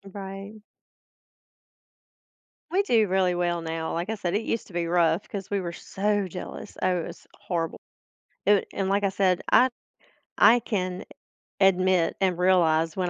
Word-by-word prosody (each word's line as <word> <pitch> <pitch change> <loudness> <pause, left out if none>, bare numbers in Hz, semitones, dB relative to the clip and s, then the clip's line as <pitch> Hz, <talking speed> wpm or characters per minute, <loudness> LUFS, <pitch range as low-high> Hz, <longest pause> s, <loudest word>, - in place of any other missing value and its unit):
Right. 195 +1 -7 2.2
We 375 +3 +3
do 225 - +3
really 185 -1 +1
well 175 -1 0
now. 160 0 -4
Like 170 +4 -3
I 220 - -1
said, 185 -3 -2
it 210 - +1
used 230 - -3
to 190 - -16
be 170 -1 -1
rough 170 +1 +2
'cause 195 -3 -6
we 200 - 0
were 170 - -4
so 205 +3 -1
jealous. 180 0 -8
Oh, 180 -1 +1
it - - -6
was - - -12
horrible. 165 -2 -3 0.7
It - - +2
w 205 - +3
and 195 -1 -1
like 200 +1 +1
I 200 - +3
said, 190 -2 +1
I 255 - +6 0.7
I 240 +2 +7
can 185 -5 -3 0.6
admit 185 -2 +3
and 185 -3 +2
realize 165 -3 +3
when 180 -1 0
185 Hz, 165 wpm, -26 LUFS, 175-200 Hz, 2.2 s, I